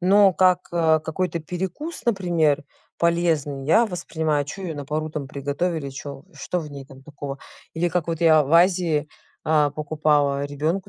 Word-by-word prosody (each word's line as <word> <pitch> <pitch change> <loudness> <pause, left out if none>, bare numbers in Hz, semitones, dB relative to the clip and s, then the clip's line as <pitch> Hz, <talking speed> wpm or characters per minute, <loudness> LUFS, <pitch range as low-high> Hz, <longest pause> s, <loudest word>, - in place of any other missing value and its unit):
но 195 +1 +5
как, 180 0 +4
э, 160 -2 +3
какой-то 170 +1 -2
перекус, 185 - -5
например, 170 -9 +1 0.3
полезный 165 -5 +1
я 220 +9 +5
воспринимаю. 160 -5 -1
Чё 190 +7 -8
её 165 -4 -4
на 145 - -5
пару 155 +2 -3
там 150 -3 -4
приготовили, 145 +2 -2
чё 140 +1 -8
что 180 - -3
в 150 -2 -8
ней 140 -1 -8
там 135 0 -15
такого? 145 -1 -7 0.4
Или 175 +2 +1
как 170 -1 -1
вот 165 0 -2
я 155 -3 +5
в 140 - -5
Азии, 170 -3 +3 0.4
а, 150 -2 +3
покупала 145 -2 +1
ребенку 155 +7 -2
160 Hz, 165 wpm, -23 LUFS, 145-175 Hz, 0.4 s, но